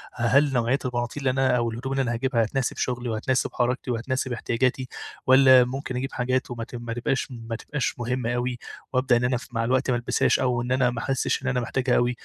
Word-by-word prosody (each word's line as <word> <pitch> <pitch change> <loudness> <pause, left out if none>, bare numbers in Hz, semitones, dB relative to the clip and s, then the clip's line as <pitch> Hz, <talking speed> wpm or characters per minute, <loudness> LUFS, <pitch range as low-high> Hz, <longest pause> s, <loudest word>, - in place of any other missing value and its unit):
ه 120 - -7
هل 140 +4 +4
نوعية 125 +3 +1
البناطيل 120 +2 -2
اللي 130 +1 0
أنا 130 -2 +3
أو 115 -1 0
الهدوم 125 +4 -5
اللي 135 - +1
أنا 120 -1 -1
هاجيبها 120 -1 +1
هتناسب 130 +3 -2
شغلي 120 -1 -2
وهتناسب 125 +4 0
حركتي 125 +1 -1
وهتناسب 130 +2 -2
احتياجاتي، 130 +2 -1 0.4
والّا 130 -1 +7
ممكن 130 0 -5
أجيب 135 +2 -4
حاجات 130 0 -1
وما 115 -1 -4
ت 125 - -9
ما 120 -1 -5
تبقاش 120 +3 -1
ما 115 -1 -6
تبقاش 135 0 -3
مهمة 120 0 -1
أوي 120 0 -2 0.3
وأبدأ 130 -1 +3
إن 120 - -1
أنا 125 +1 +2
أف 125 - -5
مع 115 -1 -1
الوقت 130 +2 +1
ما - - +2
ألبسهاش 120 - +1
أو 125 -2 +1
إن 125 +1 -4
أنا 130 -1 +3
ما 120 -1 -4
أحسش 135 0 -1
إن - - -3
أنا 125 -1 +1
محتاجها 125 +1 0
أوي 120 0 +2
125 Hz, 225 wpm, -25 LUFS, 120-130 Hz, 0.4 s, والّا